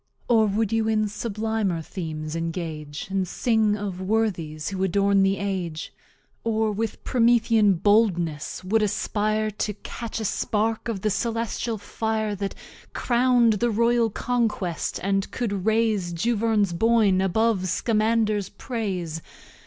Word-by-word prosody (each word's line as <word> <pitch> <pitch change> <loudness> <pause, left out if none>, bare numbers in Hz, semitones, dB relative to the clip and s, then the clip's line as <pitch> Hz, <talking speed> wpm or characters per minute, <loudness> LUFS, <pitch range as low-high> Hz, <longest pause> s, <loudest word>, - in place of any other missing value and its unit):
Or 225 -2 +4
wou'd 210 +1 0
you 225 -1 +1
in 215 -1 +2
sublimer 215 -4 -2
Themes 155 -3 -5
engage, 165 -3 -4
And 190 -1 0
sing 220 +1 +1
of 195 -3 -5
Worthies 185 -7 -1
who 190 -1 -2
adorn 200 +1 +3
the 195 0 +2
Age? 185 -5 -3 0.5
Or, 220 -1 +1
with 220 +2 -3
Promethean 230 -4 +4
Boldness, 175 -6 +1
wou'd 215 +4 +2
aspire 215 +1 0
To 210 0 -2
Catch 230 -1 -5
a 220 - -3
Spark 220 +3 -1
of 215 -5 -3
the 215 - +1
Celestial 230 +1 -2
Fire 220 +1 -2
That 200 0 -4 0.4
Crowned 240 -2 +3
the 240 - +2
Royal 235 +1 +2
Conquest, 220 -7 -1
and 195 0 0
could 205 -5 -3
raise 220 -5 +2
Juverne's 210 0 +1
Boyn 210 -1 +3
above 195 0 +1
Scamander's 215 0 +1
Praise? 190 -8 -4
210 Hz, 130 wpm, -25 LUFS, 190-225 Hz, 0.5 s, Or